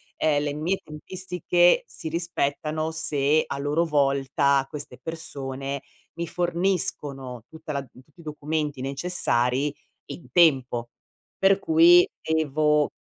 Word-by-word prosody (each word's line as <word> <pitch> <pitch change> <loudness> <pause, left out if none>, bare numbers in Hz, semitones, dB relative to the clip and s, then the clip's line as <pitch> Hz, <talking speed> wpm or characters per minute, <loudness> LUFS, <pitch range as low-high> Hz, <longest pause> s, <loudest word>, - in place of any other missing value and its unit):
ehm, 145 -2 +1
le 145 -1 -2
mie 165 +6 -1
tempistiche 180 - +1
si 160 - -8
rispettano 155 -1 -2
se 155 -1 +1
a - - -5
loro 145 +4 +1
volta 140 -2 +2
queste 150 0 -8
persone 140 -4 -5 0.3
mi 170 0 -4
forniscono 160 - -2
tutta 160 -1 -8
la 140 - -1
tutti 135 +5 -19
i - - -16
documenti 150 -1 -3
necessari 135 -2 0 0.3
in 170 - -10
tempo. 130 -8 +3 0.5
Per 195 0 +4
cui 170 +1 +6
devo 150 -1 +1
150 Hz, 115 wpm, -25 LUFS, 140-165 Hz, 0.5 s, cui